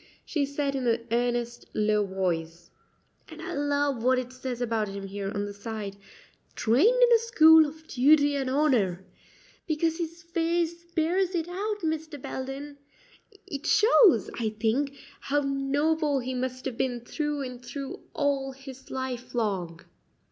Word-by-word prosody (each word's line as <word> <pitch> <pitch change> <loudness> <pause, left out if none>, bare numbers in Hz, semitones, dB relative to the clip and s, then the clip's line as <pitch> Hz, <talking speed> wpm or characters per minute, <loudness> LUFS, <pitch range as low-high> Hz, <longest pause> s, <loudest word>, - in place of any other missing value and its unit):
she 290 -4 -1
said 280 0 -2
in 260 -2 -1
an 230 0 +1
earnest, 240 0 0
low 210 0 +2
voice; 175 -3 -3 0.6
"and - - -11
I - - -5
love 285 -3 0
what 255 +1 +4
it 255 0 -4
says 255 -1 -5
about 225 -3 0
him 195 0 -6
here 195 0 -4
on 205 0 -2
the 205 - -6
side 205 -1 -6 0.6
'Trained 405 - +4
in 480 -1 +6
a 460 - +6
school 320 -9 +7
of 315 +2 -12
duty 285 +2 +4
and 270 -2 -1
honor' 240 - +1 0.6
because 325 +1 0
his 335 0 -5
face 335 0 -1
bears 355 +3 +1
it 335 -1 -1
out, 415 +4 -3
Mr. 315 -1 -3
Belden. 275 +3 -6 0.7
It 285 +2 -6
shows, 420 - +5
I 225 -2 0
think, 265 +6 0 0.2
how 290 +1 0
noble 285 +2 +1
he 260 0 -3
must 255 0 -3
have 255 -4 -4
been 245 -2 -1
through 295 +3 -3
and 250 -1 -7
through 270 +3 -6 0.2
all 275 -2 0
his 265 0 -12
life 255 -2 -5
long." 185 -8 -2
270 Hz, 155 wpm, -27 LUFS, 235-310 Hz, 0.7 s, school